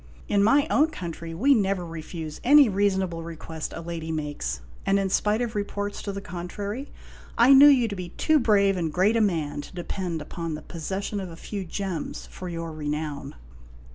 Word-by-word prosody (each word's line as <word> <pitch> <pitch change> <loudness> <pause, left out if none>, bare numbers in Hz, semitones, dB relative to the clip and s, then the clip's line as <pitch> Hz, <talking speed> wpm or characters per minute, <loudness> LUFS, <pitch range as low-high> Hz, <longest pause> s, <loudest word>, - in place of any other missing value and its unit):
j - - -4
In 200 -1 +4
my 280 +7 +5
own 305 +3 +4
country 170 - -6
we 270 +11 +4
never 195 -6 +1
refuse 160 -1 -7
any 285 +2 +7
reasonable 190 -4 0
request 160 -1 -6
a - - -5
lady 165 -1 -5
makes; 145 - -3 0.2
and, 195 0 +2
in 195 -1 0
spite 215 +5 +2
of 235 -2 -3
reports 205 -1 -3
to 200 - -4
the 200 - -5
contrary, 200 +8 -5 0.5
I 240 +4 +7
knew 275 +2 +10
you 260 -5 +5
to 205 - -4
be 180 -2 -6
too 310 - +2
brave 200 -5 +3
and 165 -3 -1
great 190 +7 +3
a 230 - +3
man 160 -8 0
to - - -12
depend 175 -1 -3
upon 165 +1 -5
the 150 - -8
posses 190 +4 -4
sion 205 - -3
of 190 -2 -5
a 165 - -9
few 195 +3 -6
gems 185 -2 -4
for 185 - -7
your 165 -1 -4
renown. 150 -2 -4
185 Hz, 200 wpm, -26 LUFS, 165-205 Hz, 0.5 s, knew